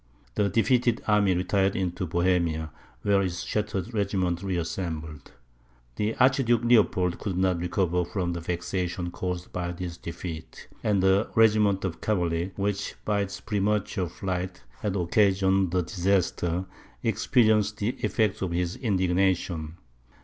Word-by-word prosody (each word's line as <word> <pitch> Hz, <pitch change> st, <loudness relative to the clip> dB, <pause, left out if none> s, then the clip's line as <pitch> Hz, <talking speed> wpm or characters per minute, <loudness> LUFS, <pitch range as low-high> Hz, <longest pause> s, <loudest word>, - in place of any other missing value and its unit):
The 105 Hz, -1 st, +1 dB
defeated 120 Hz, +2 st, +2 dB
army 105 Hz, -3 st, +4 dB
retired 95 Hz, +2 st, +1 dB
into 90 Hz, -1 st, -2 dB
Bohemia, 85 Hz, -2 st, +1 dB, 0.3 s
where 100 Hz, -1 st, +3 dB
its 90 Hz, -1 st, -2 dB
shattered 105 Hz, +1 st, -2 dB
regiments 95 Hz, -4 st, 0 dB
reassembled. 80 Hz, -4 st, -4 dB, 0.7 s
The 105 Hz, +2 st, 0 dB
Archduke 125 Hz, -3 st, +3 dB
Leopold 100 Hz, -7 st, +3 dB
could 95 Hz, -4 st, -3 dB
not 95 Hz, -2 st, +2 dB
recover 90 Hz, 0 st, 0 dB
from 90 Hz, 0 st, -2 dB
the 85 Hz, -, -3 dB
vexation 90 Hz, +1 st, -3 dB
caused 90 Hz, 0 st, -4 dB
by 90 Hz, -1 st, -2 dB
this 85 Hz, -1 st, -6 dB
defeat; 85 Hz, -1 st, -7 dB, 0.2 s
and 100 Hz, -3 st, +2 dB
the 95 Hz, +2 st, +3 dB
regiment 105 Hz, -3 st, +4 dB
of 85 Hz, -3 st, -4 dB
cavalry 90 Hz, -3 st, 0 dB
which, 100 Hz, 0 st, -2 dB
by 105 Hz, -1 st, +1 dB
its 100 Hz, 0 st, -4 dB
premature 100 Hz, -1 st, -1 dB
flight, 90 Hz, -1 st, -4 dB, 0.2 s
had 100 Hz, -2 st, -2 dB
occasioned 95 Hz, 0 st, +3 dB
the 90 Hz, +1 st, +1 dB
disaster, 90 Hz, -1 st, 0 dB, 0.4 s
experienced 110 Hz, -2 st, +2 dB
the 105 Hz, -, 0 dB
effects 110 Hz, -4 st, 0 dB
of 95 Hz, -, -1 dB
his 90 Hz, +1 st, -1 dB
indignation. 90 Hz, -, 0 dB
95 Hz, 130 wpm, -27 LUFS, 90-105 Hz, 0.7 s, army